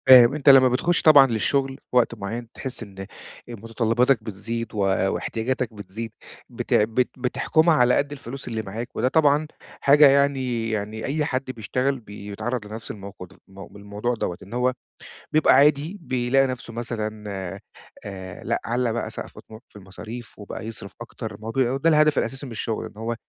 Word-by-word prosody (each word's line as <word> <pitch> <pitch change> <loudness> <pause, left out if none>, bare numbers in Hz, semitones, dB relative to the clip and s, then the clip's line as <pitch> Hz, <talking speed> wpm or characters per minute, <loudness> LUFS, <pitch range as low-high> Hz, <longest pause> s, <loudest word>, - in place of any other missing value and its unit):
فاهم. 125 -1 +9
أنت 150 -1 +3
لمّا 130 -1 +8
بتخُش 165 +8 +1
طبعًا 145 -4 +8
للشغل 135 +4 0 0.2
في - - -6
وقت 120 -1 +3
معيّن، 110 +3 -5
بتحس 130 -3 -6
إن 100 -3 -13
أ 95 - -5 0.4
مُتطلباتك 115 +2 +1
بتزيد 115 +3 -5
و - - -7 0.4
واحتياجاتك 120 +1 -2
بتزيد، 105 +2 -7 0.4
بت - - -4
بت 115 +4 +2
بتحكُمها 160 +6 +2
على 125 -3 +4
قد 140 0 0
الفلوس 135 -1 -8
اللي 110 -1 -2
معاك، 110 +4 -7
وده - - +1
طبعًا 150 +1 +3 0.3
حاجة 145 +1 +7
يعني 135 -4 +1
يعني 110 0 -3
أي 150 +2 0
حد 130 -1 -2
بيشتغل 130 +4 -1
بيتعرّض 105 +2 -5
لنفس 110 +1 -7
الموقد 95 -2 -10
م 95 0 -11
بالموضوع 105 +4 -4
دوّة. 90 -5 -3
إن 100 - -12
هو 125 +1 +1 0.6
بيبقى 155 0 +5
عادي 150 +6 +3
بيلاقي 130 -1 +1
نفسه 125 -2 -6
مثلًا 110 -2 -4 0.8
آآ 95 -2 -8
لأ - - -1
علّى 120 -1 0
بقى 120 - -3
سَقْف - - -8
طموحه 110 +2 -14
في - - -31
المصاريف، 110 +5 -10
وبقى 105 0 -7
يصرف 110 -3 -8
أكتر 110 -2 -7
ما 110 +1 -7
بي 130 +3 +2
ده 160 +4 +2
الهدف 155 -2 +4
الأساسي 135 +2 -3
من 130 - -9
الشغل. 115 0 -3
إن - - -12
هو 115 +2 -3
120 Hz, 170 wpm, -24 LUFS, 110-135 Hz, 0.8 s, فاهم